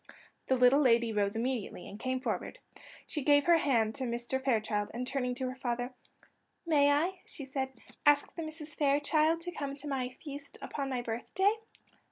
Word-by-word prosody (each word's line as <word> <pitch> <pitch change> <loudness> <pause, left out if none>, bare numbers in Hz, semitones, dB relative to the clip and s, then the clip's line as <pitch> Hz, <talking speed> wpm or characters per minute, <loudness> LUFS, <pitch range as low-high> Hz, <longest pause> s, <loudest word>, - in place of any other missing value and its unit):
The 260 - +3
little 250 +3 +6
lady 235 -3 +4
rose 205 0 +1
immediately, 230 -5 -2
and 205 - -9
came 255 +1 -1
forward; - - -3 0.5
she 300 - -3
gave 285 +1 +4
her 340 -1 +6
hand 230 -7 +2
to 260 - -3
Mr. 240 +2 -2
Fairchild, 215 -5 +1
and 250 +1 -2
turning 250 -1 -1
to 255 +1 -2
her 255 - -3
father: 245 -1 -2 0.7
"May 290 -3 +4
I," 345 +6 +1
she 280 - -7
said, 265 0 -2 0.3
"ask 290 -1 +4
the 335 - -4
Misses 310 -1 -7
Fairchild 305 +3 +2
to 355 +1 -5
come 280 -4 -4
to 295 +1 -6
my 260 -3 -1
feast 285 +2 -9
upon 275 -2 -4
my 250 -2 -2
birthday?" 245 - +1
265 Hz, 180 wpm, -32 LUFS, 245-290 Hz, 0.7 s, little